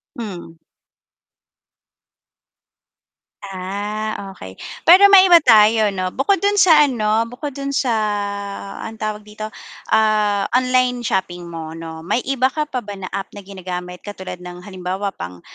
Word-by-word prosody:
Mhm. 180 Hz, -7 st, -8 dB, 2.8 s
Ah, 200 Hz, +2 st, -5 dB
okey. 95 Hz, -, -10 dB, 0.3 s
Pero 380 Hz, +4 st, +8 dB
maiba 375 Hz, -3 st, +9 dB
tayo 220 Hz, -3 st, +5 dB
'no, 185 Hz, -1 st, -2 dB
bukod 385 Hz, +9 st, +2 dB
dun 405 Hz, 0 st, +2 dB
sa 320 Hz, -6 st, +6 dB
ano 225 Hz, -3 st, 0 dB
bukod 265 Hz, +5 st, -6 dB
dun 275 Hz, 0 st, -4 dB
sa, 265 Hz, -3 st, +1 dB, 0.9 s
ano 225 Hz, -, -7 dB
tawag 215 Hz, -1 st, -4 dB
dito, 215 Hz, 0 st, -8 dB, 0.5 s
ah, 210 Hz, -2 st, +2 dB
online 255 Hz, -1 st, +1 dB
shopping 180 Hz, -3 st, -2 dB
mo 160 Hz, -1 st, -6 dB
'no, 160 Hz, -1 st, -8 dB
may 240 Hz, +8 st, 0 dB
iba 260 Hz, -1 st, +2 dB
ka 305 Hz, -, 0 dB
pa 255 Hz, -, -1 dB
ba 205 Hz, -, -6 dB
na 185 Hz, -1 st, -7 dB
app 195 Hz, -, -4 dB
na 205 Hz, -, -8 dB
ginagamit 180 Hz, -2 st, -7 dB
katulad 190 Hz, -3 st, -7 dB
ng 180 Hz, 0 st, -9 dB
halimbawa 190 Hz, +1 st, -4 dB
pang, 90 Hz, -, -8 dB
210 Hz, 135 wpm, -19 LUFS, 185-250 Hz, 2.8 s, maiba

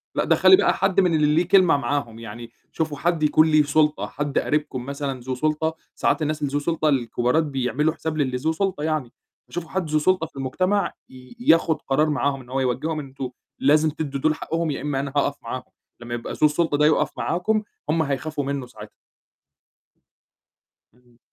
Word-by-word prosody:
لأ -, -, +1 dB
دخّلي 375 Hz, -, +6 dB
بقى -, -, +3 dB
حد 195 Hz, 0 st, +1 dB
من 180 Hz, -3 st, +3 dB
اللي 150 Hz, 0 st, +3 dB
ليه 170 Hz, +1 st, +2 dB
كلمة 185 Hz, -6 st, +5 dB
معاهم 120 Hz, -4 st, -2 dB
يعني، 115 Hz, +1 st, -9 dB, 0.2 s
شوفوا 155 Hz, -3 st, -2 dB
حد 170 Hz, -1 st, 0 dB
يكون 155 Hz, +1 st, +4 dB
ليه 155 Hz, -1 st, +4 dB
سُلطة، 150 Hz, +1 st, +1 dB
حد 145 Hz, 0 st, -2 dB
قريبكم 145 Hz, -4 st, -2 dB
مثلًا 140 Hz, -2 st, -4 dB
ذو 130 Hz, +1 st, -4 dB
سُلطة، 155 Hz, +3 st, 0 dB, 0.2 s
ساعات -, -, +1 dB
الناس 155 Hz, 0 st, -1 dB
اللي 140 Hz, -1 st, -2 dB
ذو 145 Hz, -, +2 dB
سُلطة 155 Hz, 0 st, 0 dB
الكبارات 125 Hz, +3 st, +1 dB
بيعملوا 140 Hz, +2 st, 0 dB
حساب 160 Hz, -1 st, -4 dB
للي 130 Hz, -3 st, 0 dB
ذو 160 Hz, +5 st, 0 dB
سُلطة 185 Hz, -3 st, -2 dB
يعني، 155 Hz, -6 st, -2 dB, 0.3 s
فشوفوا 170 Hz, -2 st, -6 dB
حد 185 Hz, -5 st, -2 dB
ذو 155 Hz, 0 st, +2 dB
سُلطة 180 Hz, 0 st, +1 dB
في -, -, -29 dB
المجتمع 185 Hz, +9 st, 0 dB, 0.2 s
ي 130 Hz, -, -14 dB
ياخد 165 Hz, -, +3 dB
قرار 150 Hz, +3 st, +1 dB
معاهم 140 Hz, -2 st, 0 dB
إن 125 Hz, -, -16 dB
هو 135 Hz, +1 st, -1 dB
يوجّههم 145 Hz, +5 st, -1 dB
إن 145 Hz, -, -6 dB
أنتم 135 Hz, -1 st, -6 dB, 0.3 s
لازم 150 Hz, +3 st, +4 dB
تدّوا 145 Hz, -2 st, -4 dB
دُول 155 Hz, -1 st, +2 dB
حقهم 165 Hz, -1 st, -2 dB
يا 135 Hz, -, -4 dB
إمّا 145 Hz, -2 st, -2 dB
أنا 140 Hz, 0 st, -3 dB
هاقف 145 Hz, 0 st, +1 dB
معاهم، 125 Hz, +2 st, -5 dB, 0.4 s
لمّا 120 Hz, 0 st, -7 dB
يبقى 120 Hz, -, -5 dB
ذو 155 Hz, -, +2 dB
السُلطة 150 Hz, -1 st, 0 dB
ده 150 Hz, -, +4 dB
يقف 155 Hz, -, +3 dB
معاكم، 215 Hz, +5 st, 0 dB, 0.3 s
هُم 160 Hz, +1 st, +2 dB
هيخافوا 145 Hz, +1 st, -2 dB
منه 140 Hz, -2 st, -3 dB
ساعتها. 125 Hz, -, -12 dB, 2.0 s
إمم. 125 Hz, -1 st, -28 dB
150 Hz, 190 wpm, -23 LUFS, 135-160 Hz, 2.0 s, دخّلي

